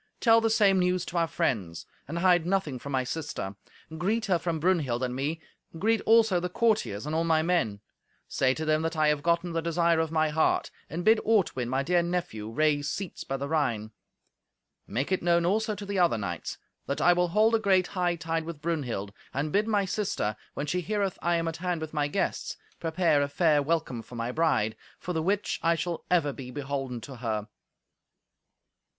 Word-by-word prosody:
Tell 230 -1 +5
the 225 - +2
same 200 -3 +4
news 180 0 +1
to 175 - -4
our 165 -1 +2
friends. 95 - -2 0.2
And 165 +4 -4
hide 175 -1 +4
nothing 180 -9 0
from 140 - -7
my 130 -1 +1
sister. 125 -8 -4 0.4
Greet 210 +7 0
her 185 -5 +2
from 165 -2 -2
Brunhild 150 -8 +1
and 125 -1 -2
me; 145 +5 -2 0.4
greet 220 +5 +2
also 220 -4 +5
the 180 +1 -3
courtiers 210 - 0
and 150 - -3
all 165 +1 +1
my 160 -1 +2
men. 160 - 0 0.5
Say 130 0 +1
to 155 - -3
them 155 0 +2
that 165 0 -2
I 155 -1 +4
have 150 -1 +1
gotten 170 +2 +1
the 165 - 0
desire 170 0 +2
of 160 -1 0
my 155 -1 +2
heart. 155 +1 +1 0.2
And 170 +2 -4
bid 220 0 +6
Ortwin, 190 - +1
my 135 +2 0
dear 175 +4 +3
nephew, 170 -12 -3
raise 145 +3 +1
seats 195 -4 -5
by 135 - -3
the 140 +1 -4
Rhine. 120 -9 0 1.0
Make 135 +9 -2
it 185 - +1
known 170 0 +3
also 215 +4 +1
to 200 +1 -7
the 200 -1 -2
other 170 -10 +3
knights 90 -5 -4 0.3
that 140 - -2
I 175 - +5
will 180 0 +2
hold 215 +6 +3
a 225 - +4
great 190 -4 +2
hightide 170 -3 -1
with 165 -3 -7
Brunhild; 135 -11 -3 0.2
and 145 +3 -1
bid 210 +2 +2
my 205 -3 +2
sister, 185 - -1 0.2
when 145 - -2
she 180 +5 -1
heareth 200 0 -1
I 175 0 +2
am 165 0 0
at 165 - -3
hand 180 -1 -2
with 160 0 -6
my 145 -1 +1
guests, 145 - -2 0.2
prepare 165 -2 +2
a 140 - +1
fair 150 0 +3
welcome 145 -5 -1
for 120 - -12
my 115 +1 -2
bride; 125 -8 +1 0.2
for 180 - -5
the 160 - 0
which 195 +5 0
I 170 0 +3
shall 170 +1 -3
ever 160 -6 +2
be 130 -2 -8
beholden 135 -3 -4
to 135 +2 -9
her." 110 -3 -3
165 Hz, 205 wpm, -28 LUFS, 140-180 Hz, 1.0 s, bid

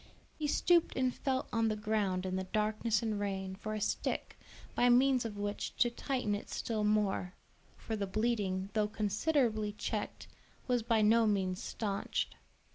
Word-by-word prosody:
He 300 - 0
stooped 340 +3 +3
and 255 -1 +1
felt 260 -1 -1
on 225 -1 +2
the 215 - +1
ground 210 -4 0
in 185 0 -2
the 190 0 -2
darkness 215 +3 0
and 215 -2 -1
rain, 190 -2 -2
for 215 +3 -5
a - - -2
stick, 210 - -1 0.4
by 245 - +4
means 255 0 +4
of 210 -2 -5
which 205 0 -3
to 240 - +3
tighten 250 -3 -1
it 205 - -4
still 220 -2 -2
more; 205 -3 +1 0.4
for 225 - -4
the 200 -2 -2
bleeding, 200 -2 0
though 215 -1 +2
considerably 215 +1 +1
checked, - - -4 0.4
was 245 -2 +1
by 225 -1 +2
no 225 +1 +5
means 190 -3 0
stanched. 200 -3 -2
215 Hz, 165 wpm, -33 LUFS, 205-235 Hz, 0.4 s, no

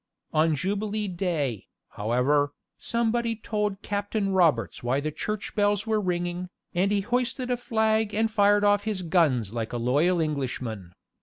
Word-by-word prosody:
On 155 0 +3
Jubilee 205 +5 -2
day, 165 - -2 0.2
however, 135 +7 +1 0.2
somebody 235 0 0
told 210 -2 -2
Captain 205 0 -1
Roberts 165 -11 +2
why 125 +3 0
the 155 +2 -2
church 210 +7 -4
bells 205 0 +1
were 220 -1 +1
ringing, 175 -1 -2 0.2
and 190 +3 +2
he 205 -1 +2
hoisted 250 +3 -1
a - - +3
flag 220 -2 +1
and 220 +1 +1
fired 205 -1 +4
off 205 0 +3
his 205 -4 -1
guns 145 - +2
like 115 -1 -3
a - - -1
loyal 145 +10 +2
Englishman. 125 - -3
190 Hz, 150 wpm, -26 LUFS, 145-215 Hz, 0.2 s, fired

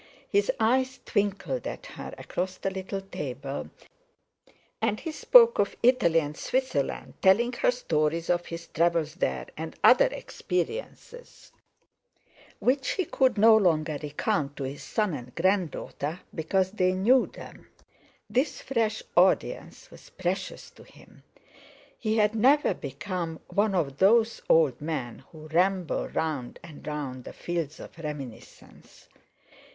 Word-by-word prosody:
His 410 +5 +2
eyes 255 +3 +2
twinkled 205 - -1
at - - -6
her - - -8
across 185 +1 -4
the 195 - -2
little 190 +1 -4
table 140 -7 -6 1.1
and 210 - 0
he 325 - -5
spoke 470 +8 +6
of - - +1
Italy 235 -10 +4
and 150 -1 -4
Switzerland, 255 - -2
telling 235 +6 +4
her - - +2
stories 165 -9 0
of 175 0 0
his 170 0 -7
travels 165 -2 +1
there, 180 - -2
and - - -6
other - - +7
experiences 485 - -5 1.1
which 265 +1 +1
he 375 - -1
could 260 -4 +2
no 220 +2 +7
longer 160 -7 +2
recount 145 -1 -1
to 140 - -5
his 135 +2 -5
son 210 -5 -1
and 125 -3 -8
grand 185 0 +2
daughter 155 +4 -5
because 185 +4 0
they 185 -3 +1
knew 235 +8 +4
them. - - -12 0.6
This 260 +5 0
fresh 225 -4 -1
audience 185 +2 +1
was - - -15
precious - - -4
to - - -16
him; - - -19 0.8
he 220 -1 0
had 210 0 +3
never 265 +7 +4
become 165 +4 -5
one 205 -1 +1
of 140 -6 -1
those 225 +3 +4
old 150 -6 +4
men 145 -7 -4
who 155 -1 -11
ramble 180 +1 +1
round 150 -6 -3
and 160 -3 -12
round 140 -4 -4
the - - -9
fields 165 -3 -4
of - - -11
reminiscence. 145 -7 -9
185 Hz, 135 wpm, -27 LUFS, 155-225 Hz, 1.1 s, other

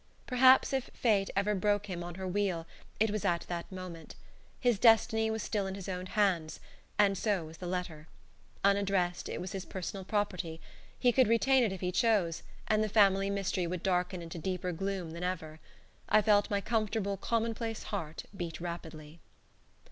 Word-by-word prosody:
Perhaps 260 +1 +5
if 265 -1 -1
Fate 205 -5 +2
ever 200 +2 +2
broke 205 +1 +1
him 180 -4 -5
on 175 -1 -7
her 190 0 -5
wheel 185 -3 -1 0.3
it 220 0 +3
was 215 -2 -2
at 170 -1 +1
that 175 +1 -6
moment. 180 -3 -8 0.4
His 245 -5 +2
destiny 220 -1 +5
was 220 0 -2
still 205 -3 -1
in 190 - -4
his 195 -2 -8
own 185 -1 -4
hands, 180 -7 0 0.4
and 200 -1 +4
so 195 -3 0
was 160 +1 -11
the 180 - -6
letter. 175 -4 -4 0.6
Unaddressed, 195 -3 +1
it - - -4
was 180 +1 -5
his 195 -2 -4
personal 190 +1 -5
property. 185 -5 -2 0.4
He 245 - +4
could 255 0 +4
retain 255 +3 +4
it 220 - +1
if 190 - -6
he 180 -1 -1
chose, 190 -5 +2 0.3
and 215 0 +3
the 215 - -1
family 195 -2 +4
mystery 195 -3 -1
would 180 0 -4
darken 180 -1 0
into 165 0 -7
deeper 180 +1 -2
gloom 190 -1 -3
than 170 +2 -6
ever. 160 -4 -4 0.5
I 215 - +5
felt 205 -1 +4
my 200 -1 0
comfortable, 215 -2 -1
commonplace 225 +2 -2
heart 165 -6 -5
beat 170 -3 -5
rapidly. 165 -2 -7
195 Hz, 180 wpm, -31 LUFS, 175-210 Hz, 0.6 s, Perhaps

